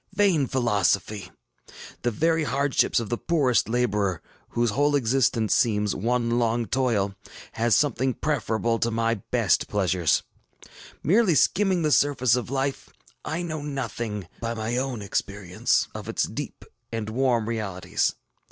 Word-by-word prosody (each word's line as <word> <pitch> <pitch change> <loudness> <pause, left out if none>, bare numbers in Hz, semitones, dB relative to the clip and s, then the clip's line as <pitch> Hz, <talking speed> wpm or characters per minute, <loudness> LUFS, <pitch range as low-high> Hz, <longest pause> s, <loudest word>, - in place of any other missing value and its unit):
Vain 190 -9 +3
philosophy! 105 -5 0 0.7
The 120 - +1
very 160 +8 +1
hardships 140 0 +1
of 115 -3 -5
the 120 - -2
poorest 135 -10 +1
laborer, 105 -7 0 0.3
whose 120 -1 0
whole 145 +5 +2
existence 120 -4 +2
seems 105 -3 +2
one 120 +2 0
long 115 0 +1
toil, 110 -4 0 0.4
has 115 -1 +2
something 130 -3 +1
preferable 115 -5 -1
to 115 - +1
my 115 0 +1 0.2
best - - +2
pleasures. 90 -5 +1 0.8
ŌĆ£Merely 185 - +4
skimming 190 -3 +2
the 155 - +1
surface 135 -5 +3
of 125 -2 -3
life, 135 0 -2 0.3
I 160 +4 -3
know 155 -3 -4
nothing, 115 - -4
by 115 0 -3
my 110 +2 -2
own 125 -4 -2
experience, 100 -2 -1
of - - -7
its - - 0
deep - - -6 0.3
and 115 -2 -3
warm 120 -1 +1
realities. 105 -5 -1
120 Hz, 135 wpm, -25 LUFS, 110-140 Hz, 0.8 s, ŌĆ£Merely